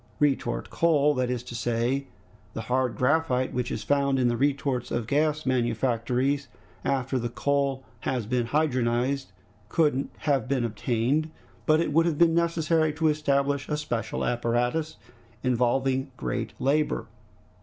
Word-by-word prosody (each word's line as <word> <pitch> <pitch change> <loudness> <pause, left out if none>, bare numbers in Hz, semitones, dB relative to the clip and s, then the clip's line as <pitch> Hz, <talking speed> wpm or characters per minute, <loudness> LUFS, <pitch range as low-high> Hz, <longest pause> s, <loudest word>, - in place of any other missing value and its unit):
Retort 135 -4 0
coal, 150 -3 +3
that 130 -2 0
is 125 -1 -2
to 125 - -9
say, 120 +4 -1 0.5
the 115 - -3
hard 125 +1 0
graphite 130 -1 +1
which 125 -1 -1
is 105 - -4
found 140 +2 +2
in 125 -2 +3
the 120 - 0
retorts 135 -2 0
of 120 -2 -2
gas 150 +4 +1
manufactories, 125 +2 0 0.4
after 130 -1 0
the 120 0 -2
coal 140 +1 0 0.2
has 125 -4 -2
been 120 +1 0
dehydrogenized, 130 -2 +1 0.4
could 145 -1 +2
have 140 -5 0
been 130 -2 +1
obtained, 120 +7 0 0.4
but 155 0 +5
it 165 -3 0
would 165 +2 +4
have 160 -3 0
been 170 0 +5
necessary 165 -1 +2
to 160 +1 +2
establish 140 -2 0
a 150 - 0
special 120 -7 -2
apparatus, 120 +6 0 0.5
involving 130 +2 +1
great 115 -3 -3
labor. 150 +3 +1
135 Hz, 145 wpm, -27 LUFS, 120-150 Hz, 0.5 s, but